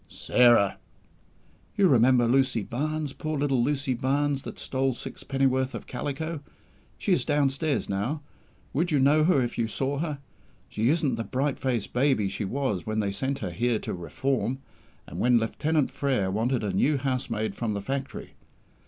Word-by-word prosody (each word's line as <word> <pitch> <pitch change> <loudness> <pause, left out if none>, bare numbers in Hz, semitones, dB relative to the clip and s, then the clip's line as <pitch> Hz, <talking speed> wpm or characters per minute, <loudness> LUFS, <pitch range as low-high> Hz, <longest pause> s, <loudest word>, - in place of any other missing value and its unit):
"Sarah!" 120 -5 +3 1.0
"You 195 - +5
remember 125 -3 +4
Lucy 130 -3 +2
Barnes 150 +5 -3
poor 155 -1 -3
little 135 -4 +1
Lucy 140 0 0
Barnes 140 +2 0
that - - -8
stole 130 -1 -1
sixpennyworth 135 0 -1
of - - -7
calico. 145 +5 -4 0.6
She 195 - +1
is - - +2
downstairs 145 0 +1
now. 115 +10 -2 0.5
Would 165 +6 +1
you 150 - +2
know 145 +3 +4
her 150 -7 +4
if 120 0 -4
you 115 - +1
saw 135 +5 -2
her? 155 -3 -2 0.5
She 110 +3 0
isn't 145 -6 +1
the 115 - -2
bright 135 +4 -1
faced 125 -5 -2
baby 125 -6 +2
she 105 - -4
was 105 -5 -1
when 110 0 -2
they 100 -2 0
sent 135 +7 -2
her 90 - -3
here 120 +5 +1
to - - -5
'reform', 125 - -2 0.5
and - - -8
when 125 0 +4
Lieutenant 150 +6 0
Frere 125 -10 0
wanted 115 +4 0
a 100 -2 -1
new 140 +10 +2
housemaid 120 -6 -2
from 110 0 -2
the 100 - -2
Factory! 135 +3 -5
130 Hz, 165 wpm, -27 LUFS, 115-145 Hz, 1.0 s, You